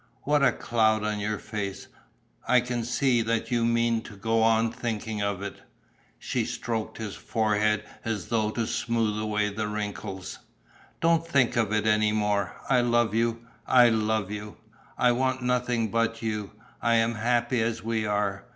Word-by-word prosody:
What 150 0 +2
a 140 - +5
cloud 110 -2 +1
on 105 0 -1
your 105 +1 -1
face! 100 -3 -5 0.6
I 125 - +5
can 120 -1 -2
see 125 0 +2
that 115 +1 -1
you 120 -1 +2
mean 115 0 +2
to 110 - -11
go 115 +3 +1
on 115 0 +3
thinking 110 -2 -3
of 100 -1 -2
it." 100 - -6 0.6
She - - -2
stroked 115 -2 -3
his 110 -3 -5
forehead 105 -1 +1 0.2
as 110 -5 -3
though 110 -2 +1
to 115 +1 -2
smooth 115 -2 -1
away 105 -1 0
the 105 +1 -3
wrinkles: 105 -3 -5 0.6
"Don't 165 0 +3
think 135 -6 +2
of 115 -4 +1
it 110 0 +1
any 105 0 +3
more. 105 -2 0
I 125 -2 +4
love 120 -2 +2
you, 115 +1 0 0.2
I 125 -2 +7
love 110 -2 0
you! 105 0 -7 0.4
I 125 - +4
want 130 +1 0
nothing 125 -3 0
but 115 0 0
you. 105 -3 -3 0.3
I 115 0 +3
am 115 +1 +2
happy 120 +2 +1
as 115 0 -1
we 110 -1 -1
are. 105 0 -1
110 Hz, 170 wpm, -27 LUFS, 105-120 Hz, 0.6 s, I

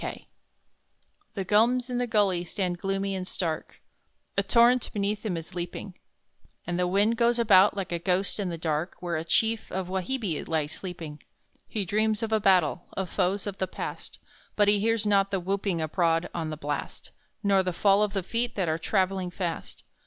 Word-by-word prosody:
Kooroora - - -6 1.1
The 195 - -2
gums 235 +6 +3
in 245 -1 -2
the 245 - 0
gully 200 -6 +2
stand 180 -1 -3
gloomy 195 +1 -1
and 185 -1 -4
stark, 165 -4 -4 0.5
A - - +3
torrent 240 +1 +4
beneath 205 0 -1
them 195 -6 -2
is 165 +3 -8
leaping, 175 +2 -5 0.7
And 175 0 -2
the 180 - +2
wind 205 +5 +2
goes 235 0 +3
about 205 -3 +5
like 190 -3 -3
a 170 - -1
ghost 185 +4 0
in 195 -3 -1
the 170 - -4
dark 160 +1 -2
Where 175 -1 -3
a 160 - -2
chief 220 +6 +1
of 185 -1 -3
Wahibbi 190 - -2
lies 155 -2 -1
sleeping! 165 -5 -7 0.5
He 210 -3 -3
dreams 215 +3 +1
of 225 - -2
a 220 - +3
battle 180 -4 +3
of 190 -3 -3
foes 195 +3 0
of 200 -2 -5
the 190 - 0
past, - - -7 0.4
But 205 -1 +4
he 205 0 +4
hears 225 +1 +1
not 200 -1 +3
the 195 -1 -1
whooping 190 -1 -1
abroad 165 +1 +1
on 165 -2 -3
the 155 - -5
blast, 145 -1 -5 0.3
Nor 200 -1 +4
the 185 -1 -1
fall 195 +3 +3
of 210 -1 +1
the 195 -2 -1
feet 235 +5 -1
that 190 -4 0
are 160 +1 0
travelling 190 0 0
fast. 175 -2 -5
190 Hz, 190 wpm, -27 LUFS, 175-210 Hz, 1.1 s, about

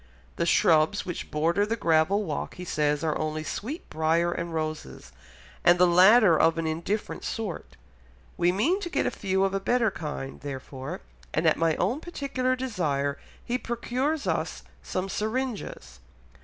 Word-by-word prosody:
The 170 - 0
shrubs 160 +4 +3
which 175 - -5
border 165 +6 +1
the 220 +2 0
gravel 170 +1 +2
walk 155 -7 -4
he 180 - -7
says 150 -2 0
are 155 -2 0
only 155 0 -2
sweet 260 - -5
briar 165 +2 +1
and 170 0 -4
roses, 155 - -5 0.5
and 175 +1 +6
the 180 - +6
latter 185 +1 +6
of 165 0 +4
an 165 - -1
indifferent 170 +7 -3
sort; 210 - -5 0.6
we 175 +1 +3
mean 285 - +1
to 355 - -5
get - - 0
a - - +1
few 190 -1 0
of 195 0 +1
a 195 - 0
better 230 +2 +2
kind 145 -5 -6
therefore, 135 -1 -6 0.3
and 160 - +1
at 160 - +5
my 165 -1 +1
own 260 - 0
particular 275 -6 -2
desire 155 - -1 0.3
he 245 +1 -1
procures 255 +6 -2
us - - -2 0.2
some 185 +1 -3
syringas. 215 - -4
175 Hz, 160 wpm, -27 LUFS, 155-225 Hz, 0.6 s, and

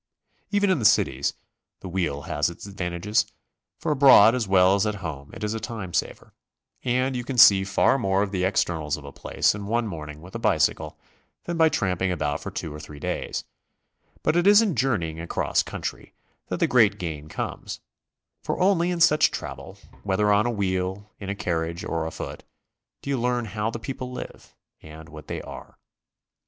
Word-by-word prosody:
Even 205 -1 +2
in 185 - +2
the - - -3
cities 70 -7 +3 0.5
the - - -7
wheel 85 -6 -2
has 75 +3 0
its 85 - -10
ad 100 - -11
vantages, 90 +4 0 0.5
for 160 - -2
abroad 130 -6 +7
as 125 -5 -1
well 95 0 +5
as 100 +2 +2
at 105 - -1
home 70 -3 -6
it - - -8
is 105 +1 -1
a 110 - -3
time 110 -5 -6
saver, - - -3 0.5
and 130 +1 0
you 125 - -2
can 130 +1 -5
see 100 -4 +8
far 95 +7 +2
more 95 -3 +1
of 100 - -4
the 95 -2 -1
externals 80 -6 0
of 75 - -12
a 70 - -8
place - - 0
in 100 0 -6
one 115 +2 0
morning 75 -6 -7
with 90 +4 -13
a - - -4
bicycle - - +1 0.5
than 175 - -3
by 160 -1 +5
tramping 95 - 0
about 75 -4 -1
for - - -5
two 75 - -5
or 75 - -8
three 75 -1 -10
days, - - -3 0.8
but - - +2
it 175 +2 +3
is 205 0 +8
in 220 -5 +2
Journeying 85 -12 0
across 85 - 0
country - - -6 0.3
that - - -3
the - - +4
great 110 -5 +4
gain 80 -5 -6
comes, - - -5 0.6
for - - -3
only 180 -2 +3
in 175 -1 -2
such 155 -2 +5
travel, - - -7 0.2
whether 105 +1 +1
on 105 +3 +3
a - - +1
wheel, 95 -1 -2
in 100 -2 -6
a 100 - -2
carriage 85 -3 -2
or 80 -1 -2
a - - -5
foot, - - -7 0.6
do 140 - -3
you 135 -4 0
learn 125 -1 0
how 105 +1 -2
the 115 - -5
people 130 +1 -6
live 125 - -9 0.3
and 80 +1 -12
what 75 -1 -11
they - - -5
are. - - -11
100 Hz, 195 wpm, -25 LUFS, 85-120 Hz, 0.8 s, see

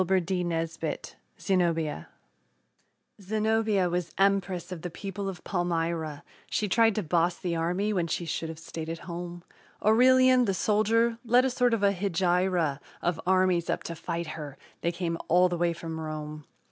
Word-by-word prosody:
ZENOBIA 165 - 0 1.1
Zenobia 215 -1 +1
was 175 -1 -2
empress 195 -2 +1
of 175 -3 -6
the 180 - -4
people 195 +3 -5
of 185 - -8
Palmyra; 165 -4 -2 0.3
She 210 - 0
tried 225 +1 +4
to 215 - -1
boss 170 +2 +1
the 175 -2 -2
army 180 +6 0
when 175 -4 0
she 170 +1 -2
should 165 0 -3
have 160 - -7
stayed 160 0 -7
at 165 - -3
home. 175 0 -6 0.4
Aurelian, 255 +3 +6
the 195 -3 0
soldier, 225 +4 +2
led 245 +2 +4
a 265 - +1
sort 245 -1 +2
of 205 - -4
a 200 0 +4
hegira 180 -5 +1 0.2
Of 175 -2 0
armies 185 -2 +3
up - - -1
to 170 - -5
fight 170 +1 -4
her 150 -3 -7 0.2
they 170 - +1
came 170 -1 -3
all 180 +2 +5
the 175 - -2
way 175 0 +2
from 165 -1 -6
Rome. 155 -1 -6
180 Hz, 160 wpm, -28 LUFS, 165-205 Hz, 1.1 s, Aurelian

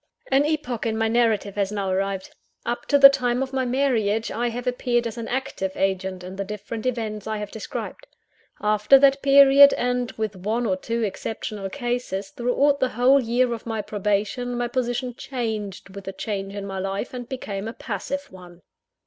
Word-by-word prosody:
I. 265 - +5
AN 285 - +3
epoch 275 -7 -2
in 220 -1 -1
my 225 0 +1
narrative 220 -3 +1
has 200 -1 -1
now 200 -2 -2
arrived. 195 0 -2 0.3
Up 240 +1 -3
to 285 - +4
the 275 0 +11
time 255 -2 +1
of 265 0 -7
my 260 -1 0
marriage, 235 -5 +1
I 240 +2 -1
have 245 +2 -5
appeared 245 -1 0
as 230 - -4
an 230 -1 -5
active 250 -7 -3
agent 190 -1 -1
in 185 +1 -8
the 200 - -1
different 210 +3 -5
events 220 -4 -3
I 220 0 -2
have 210 -1 -6
described. 225 - -6 0.5
After 210 +5 +5
that 275 0 +4
period, 280 0 +8
and 245 -1 -1
with 220 -2 -3
one 220 +6 -1
or 190 -4 +1
two 230 +5 -3
exceptional 210 -1 -4
cases 240 -4 -3
throughout 275 +4 +1
the 260 -2 +2
whole 255 +4 +4
year 240 +1 +1
of 230 0 -7
my 220 -2 -2
probation, 210 +4 -1
my 240 0 0
position 245 0 -2
changed 215 -7 -5
with 200 -1 -9
the 195 - -5
change 195 0 -4
in 200 -1 -5
my 195 -1 -4
life, 195 +6 -3
and 245 -1 -7
became 210 -6 -5
a 225 - -5
passive 280 +8 -5
one. 180 -2 -14
230 Hz, 190 wpm, -24 LUFS, 200-250 Hz, 0.5 s, the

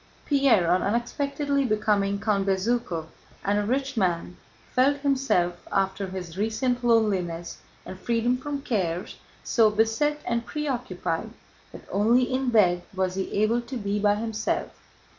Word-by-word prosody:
Pierre, 265 - +3
on 180 +1 +3
unexpectedly 280 +5 0
becoming 210 -3 +1
Count 205 -2 0
Bezúkhov 195 -3 0 0.4
and 205 +1 +2
a - - 0
rich 265 +5 -1
man, 180 -4 0 0.4
felt 270 +3 +3
himself 260 -11 +1
after 195 0 0
his 185 -1 -7
recent 245 +3 0
loneliness 190 -8 +1 0.3
and 185 - -8
freedom 235 +3 +1
from 280 +2 -5
cares 185 -8 -2 0.3
so 225 -3 +4
beset 225 +8 +1
and 235 0 -1
preoccupied 240 - -3 0.4
that - - -12
only 230 +5 +3
in 255 +1 0
bed 180 -6 +4
was 185 -1 0
he 190 0 -3
able 230 +3 +2
to 255 +2 -6
be 205 -2 -2
by 205 0 +3
himself. 215 0 -2
215 Hz, 140 wpm, -26 LUFS, 190-250 Hz, 0.4 s, so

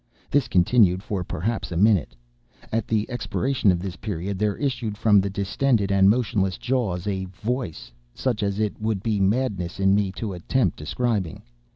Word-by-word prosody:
This 145 -2 +2
continued 95 0 +3
for 100 -4 -3
perhaps 105 +7 -3
a 85 - -2
minute. 95 - +3 0.6
At 115 -1 -1
the 110 -1 0
expiration 120 -2 0
of 90 - +1
this 90 0 -5
period, 95 -2 -4
there 105 -1 0
issued 120 -7 -2
from 105 -2 +5
the 100 - -2
distended 100 +2 0
and 95 0 +5
motionless 105 -5 +1
jaws 110 -9 -1
a 95 -2 -2
voice—such 95 - -4
as 100 0 -1
it 105 0 -2
would 110 -3 -1
be 110 -3 0
madness 95 -4 0
in 95 0 +4
me 100 -1 +2
to 105 -2 -4
attempt 90 +2 0
describing. 95 +2 -2
100 Hz, 165 wpm, -24 LUFS, 95-115 Hz, 0.6 s, from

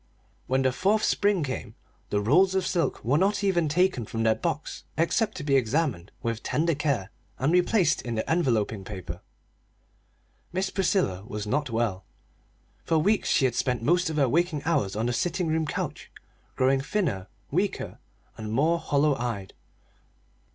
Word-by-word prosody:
When 130 +1 +2
the 130 - +3
fourth 200 +10 +1
spring 200 -5 +2
came 130 -2 -5 0.3
the 105 - +1
rolls 180 - +4
of 190 -1 +1
silk 170 - -1
were 140 +6 +3
not 200 +2 +1
even 175 -5 +2
taken 180 -5 +2
from 115 +1 -3
their 110 0 +4
box 160 +3 -4
except 205 +7 +1
to 160 - -5
be 140 -1 +2
examined 125 - 0
with 115 -2 -2
tender 165 +2 +1
care 140 -9 -1 0.3
and 145 +6 +1
replaced 180 -1 +3
in 120 -2 -4
the 110 - 0
enveloping 115 - +1
paper. 90 -3 -7 1.3
Miss 190 +2 -1
Priscilla 185 - +1
was 105 -3 -4
not 145 +6 -1
well. 110 -5 -1 0.8
For 165 - +1
weeks 200 +7 +2
she 135 - +3
had 125 - +1
spent 125 -1 -1
most 175 +5 +2
of 155 - -3
her 140 -3 +4
waking 155 +1 +1
hours 145 - +1
on 110 +2 -1
the 120 - 0
sitting 175 +6 -1
room 160 0 0
couch, - - -4 0.5
growing 135 +1 +3
thiner, 135 - -1 0.2
weaker, 185 +7 -1 0.4
and 110 -1 -5
more 155 +8 +2
hollow 150 -2 +2
eyed. 115 -6 -4
145 Hz, 165 wpm, -27 LUFS, 115-175 Hz, 1.3 s, rolls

